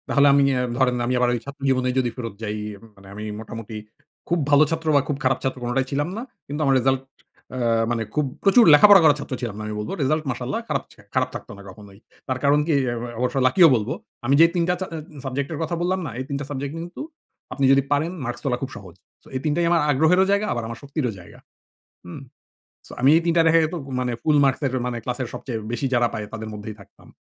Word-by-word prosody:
তাহলে 140 0 +4
আমি 140 0 +5
অ্যা 125 - 0 0.2
ধরেন 125 -2 +2
আমি 125 - 0
আবার 125 0 +3
ঐ - - +1
ছাত্র 140 0 -10
জীবনেই 130 -1 +1
যদি 125 -2 0
ফেরত 115 -4 -5
যাই, 105 -1 -3 0.2
এম 100 - -20
মানে 95 0 -17
আমি 105 +1 -7 0.2
মোটামুটি 115 0 -8 0.5
খুব 175 0 +1
ভালো 145 +1 +6
ছাত্র 160 0 -3
বা 140 - +5
খুব 145 - -2
খারাপ 130 0 +2
ছাত্র 130 0 -2
কোনটাই 120 +2 0
ছিলাম 145 +2 0
না। - - -3 0.3
কিন্তু 145 +2 -4
আমার 135 -1 +3
রেজাল্ট 130 +1 +1 0.5
অ্যা 115 -3 +1
মানে 115 -1 -1
খুব 150 -1 +2 0.2
প্রচুর 215 +4 +6
লেখাপড়া 200 +6 +9
করার 150 -2 +5
ছাত্র 140 - -6
ছিলাম 115 -5 -4
না - - -5
আমি 105 - -4
বলব। 105 - -5
রেজাল্ট 155 +3 +1
মাশাল্লাহ 125 - -3
খারাপ - - -1
ছে - - -25
খারাপ - - +1
থাকতো - - -8
না - - -11
কখনোই। 100 0 -14 0.3
তার 130 -1 -2
কারণ 145 +1 +4
কি? 165 - +2
অ্যা 120 - -1
ও - - -3
অবশ্য 125 +1 -1
লাকিও 170 +6 +6
বলবো। 110 +1 -1 0.3
আমি 135 +3 +3
যে - - +9
৩ 175 - +2
টা - - +4
চা 190 - -2
অ্যা 155 -2 -8
সাবজেক্ট 135 +1 -3
এর 155 - -5
কথা 160 +2 -2
বললাম 185 +2 0
না? 140 - -5
এই - - -2
৩ 140 - -2
টা 145 - -5
সাবজেক্ট 140 +1 -4
কিন্তু 170 +2 -7 0.5
আপনি 140 - 0
যদি 135 0 +5
পারেন 150 +4 +1
মার্কস 120 - -5
তোলা 130 -4 0
খুব 135 - -4
সহজ। 95 -6 -12 0.3
সো - - -19
এই - - 0
৩ 155 - +2
টাই 170 0 +1
আমার 170 -2 +4
আগ্রহেরও 160 +7 +4
জায়গা 200 +1 +2
আমার 115 0 -4
শক্তিরও 140 -3 -2
জায়গা। 85 - -15 0.7
হুম। 90 +8 -9 0.7
সো - - -14
আমি 130 - +5
এই - - +1
৩ 170 - +2
টা - - +6
দেখা 165 +1 +5
যেতো 160 +3 -4 0.2
মানে 125 -1 -1
ফুল 155 -2 +3
মার্কসের 135 0 +1
মানে 125 -1 -3
ক্লাসের 125 +1 -3
সবচেয়ে 120 -4 -5
বেশি 120 +3 -2
যারা 120 -1 +3
পায় 105 - -4
তাদের 110 -1 -6
মধ্যেই 105 0 -7
থাকতাম। 100 - -18
135 Hz, 240 wpm, -23 LUFS, 120-150 Hz, 0.7 s, লেখাপড়া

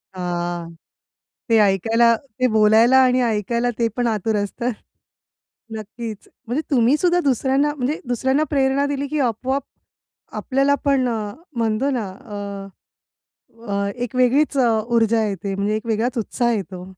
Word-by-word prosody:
हां. 175 -1 -3 0.8
ते 225 - +4
ऐकायला 225 +4 +3
ते 255 0 -3
बोलायला 220 +4 +5
आणि 255 0 +3
ऐकायला, 235 +2 0
ते 230 -1 +2
पण 245 -1 0
आतुर 220 -1 0
असतं. 220 +5 -2 1.1
नक्कीच. 220 0 -8 0.2
म्हणजे 260 +7 -1
तुम्ही 255 +2 +4
सुद्धा 355 0 +2
दुसऱ्यांना 275 +2 +1
म्हणजे 280 +3 -2
दुसऱ्यांना 265 +5 +1
प्रेरणा 275 -1 +2
दिली, 285 0 -2
की 305 - -2
आपोआप 260 +3 -1 0.7
आपल्याला 275 +1 +1
पण 270 -3 +2
अ, 215 -3 -3 0.2
म्हणतो 230 +4 0
ना? 240 -7 -2
अ, 200 -1 -9 0.8
अ, 200 0 0
एक 245 0 -4
वेगळीच 270 +4 +3
अ, 245 -2 +4 0.3
ऊर्जा 225 -1 +3
येते. 195 -1 -4
म्हणजे 200 +2 -1
एक 215 +1 -6
वेगळाच 230 +3 -1
उत्साह 235 +2 0
येतो. 185 -4 -4
235 Hz, 140 wpm, -21 LUFS, 210-265 Hz, 1.1 s, बोलायला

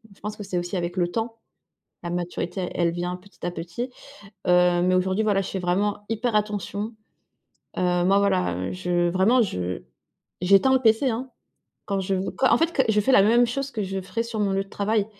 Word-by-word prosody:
je - - -25
pense 210 0 -5
que 205 - -6
c'est 190 -2 -3
aussi 175 +2 -3
avec 175 0 -3
le 175 -1 +2
temps. 225 +4 -4 0.6
La 175 - -4
maturité, 175 +1 -3
elle 170 -1 +2
vient 175 +1 -3
petit 195 +2 -15
à 175 - 0
petit, 175 +10 -5 0.6
heu. 180 0 +4
Mais 185 0 +3
aujourd'hui, 190 +3 +1
voilà, 200 -2 +2
je 190 - -5
fais 190 - -3
vraiment 200 +3 0
hyper 225 +1 -1
attention. 210 +1 -2 0.8
Heu, - - -2 0.2
moi, 195 +2 +4
voilà, 90 - +1
heu, 90 +1 -3
je 175 -1 0
vraiment 200 +8 +4
je 90 - -3 0.6
j'éteins 195 +8 +5
le 260 - +3
PC, 225 +3 +3
hein. 250 +3 -4 0.6
Quand 195 -1 -1
je 190 +1 -1
v 190 +1 -1
quand 260 - +3
en 235 - +5
fait, 330 +1 +1
que 265 - +3
je 210 - +3
fais 265 +6 +2
la 230 - +7
même 235 +4 +5
chose 275 +3 -3
que 215 -5 -3
je 195 0 -3
ferais 230 +5 -2
sur 230 -2 -4
mon 200 -2 +1
lieu 195 0 0
de - - -21
travail. 205 0 0
195 Hz, 215 wpm, -24 LUFS, 180-220 Hz, 0.8 s, la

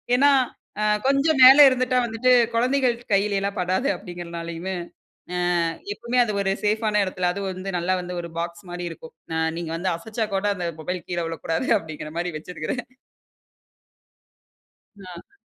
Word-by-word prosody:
ஏன்னா, 280 +3 +5 0.5
"அ - - +1 0.2
கொஞ்சம் 275 +2 +2
மேல 265 +3 +10
இருந்துட்டா 255 0 0
வந்துட்டு 235 +2 +1 0.2
குழந்தைகள் 250 +1 +2 0.2
கையிலலாம் 200 0 +1
படாது." 185 +8 0
அப்படீங்குறதுனாலையுமே, 170 0 -6 0.9
அ - - +2 0.3
எப்பவுமே 235 +3 0
அது 215 -3 -3
ஒரு 195 0 +1
சேஃப்பான 210 0 +2
இடத்துல 185 -1 -1
அது 200 +2 -5
வந்து 185 +1 -5
நல்லா 185 +2 0
வந்து 180 0 -6
ஒரு 170 - -8
பாக்ஸ் 170 +1 -6
மாரி 175 0 -4
இருக்கும். 160 0 -12 0.2
"அ - - 0 0.2
நீங்க 165 -2 -4
வந்து 185 +2 -1
அசச்சா 220 +5 -3
கூட, 195 +2 -1
அந்த 180 -2 -3
மொபைல் 180 +2 -4
கீழ 175 - -3
விழக்கூடாது." 165 0 -3
அப்படீங்குறமாரி 160 +2 -5
வச்சுருக்குறேன். 180 - -5 2.1
ஆ. 185 - -12
190 Hz, 140 wpm, -24 LUFS, 175-230 Hz, 2.1 s, மேல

